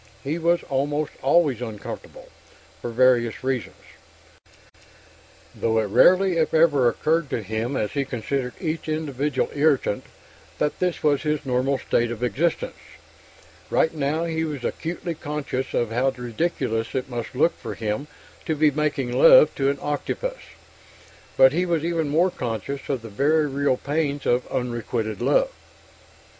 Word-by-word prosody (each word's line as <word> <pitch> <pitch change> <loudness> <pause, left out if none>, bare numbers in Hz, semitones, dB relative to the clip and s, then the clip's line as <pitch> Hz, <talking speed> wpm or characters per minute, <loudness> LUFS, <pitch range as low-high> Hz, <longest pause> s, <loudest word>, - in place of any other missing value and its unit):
He 150 +5 -2
was 170 +1 +2
almost 145 +2 -1
always 140 -3 +3
uncomfortable, 110 -4 -8 0.5
for - - -4
various 120 -1 +2
reasons; 130 -4 -2 1.8
though 115 0 0
it 110 - +3
rarely 185 - +5
if 160 0 +1
ever 145 -6 +5
occurred 155 +4 0
to 115 - -2
him, 110 +6 -2
as 105 - -1
he 140 0 0
considered 125 0 -3
each 160 -2 -3
individual 145 -3 -1
irritant, 145 -7 +1 0.5
that 150 - -1
this 180 -2 -1
was 145 -2 +3
his 150 -2 -1
normal 130 +1 +1
state 120 -2 0
of 120 0 -5
existence. 140 +9 -1 0.9
Right 160 - +2
now 155 +2 -1
he 160 -1 -1
was 150 -5 -4
acutely 170 +1 -3
conscious 145 -4 -4
of 120 -2 0
how 125 +4 +2
ridiculous 125 -2 -2
it 130 0 -1
must 120 -1 -6
look 150 +6 +3
for - - -6
him 110 +6 -3 0.4
to 160 - +1
be 150 0 +4
making 145 -4 -1
love 135 +4 +7
to 135 0 +1
an 140 - -1
octopus, - - -3 1.0
but 130 0 +7
he 175 +3 +1
was 165 -2 0
even 165 -3 0
more 170 +5 +3
conscious 125 - -5
of 130 -5 -2
the 115 - -8
very 150 +9 +2
real 140 -2 0
pains 145 0 -2
of 125 +1 +1
unrequited 120 -3 -3
love. - - +2
140 Hz, 150 wpm, -24 LUFS, 125-155 Hz, 1.8 s, love